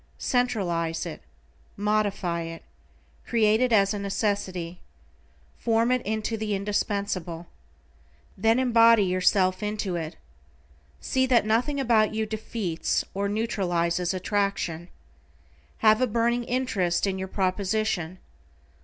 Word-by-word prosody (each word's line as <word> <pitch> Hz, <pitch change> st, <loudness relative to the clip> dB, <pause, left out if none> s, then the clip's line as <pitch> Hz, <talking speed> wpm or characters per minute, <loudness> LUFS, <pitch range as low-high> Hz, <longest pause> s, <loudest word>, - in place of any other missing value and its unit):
Centralize 175 Hz, -10 st, 0 dB
it. 165 Hz, -, -7 dB, 0.6 s
Modify 205 Hz, -5 st, 0 dB
it. 165 Hz, 0 st, -7 dB, 0.6 s
Create 220 Hz, -1 st, +3 dB
it 255 Hz, -1 st, +2 dB
as 200 Hz, -2 st, +4 dB
a 205 Hz, -, -3 dB
necessity. 195 Hz, -4 st, -2 dB, 0.8 s
Form 230 Hz, +1 st, +2 dB
into 220 Hz, -2 st, -1 dB
it -, -, -1 dB
the 215 Hz, -1 st, -1 dB
indispensable. 200 Hz, -4 st, -2 dB, 0.9 s
Then 225 Hz, +4 st, +2 dB
embody 230 Hz, -3 st, +5 dB
yourself 185 Hz, +1 st, +2 dB
into 210 Hz, -3 st, -2 dB
it. 160 Hz, -2 st, -5 dB, 0.9 s
See 260 Hz, 0 st, +1 dB
that 245 Hz, -4 st, +3 dB
nothing 245 Hz, +7 st, +1 dB
about 225 Hz, -5 st, +2 dB
you 220 Hz, 0 st, 0 dB
defeats, 215 Hz, -5 st, -2 dB
or 200 Hz, +1 st, -1 dB
neutralizes 180 Hz, -5 st, 0 dB
attraction. 185 Hz, -3 st, -2 dB, 1.0 s
Have 215 Hz, +2 st, +6 dB
a 255 Hz, -, +3 dB
burning 235 Hz, +2 st, 0 dB
interest 225 Hz, -10 st, 0 dB
in 190 Hz, -1 st, -2 dB
your 190 Hz, -, -4 dB
proposition. 190 Hz, -2 st, -1 dB
205 Hz, 110 wpm, -26 LUFS, 185-225 Hz, 1.0 s, Have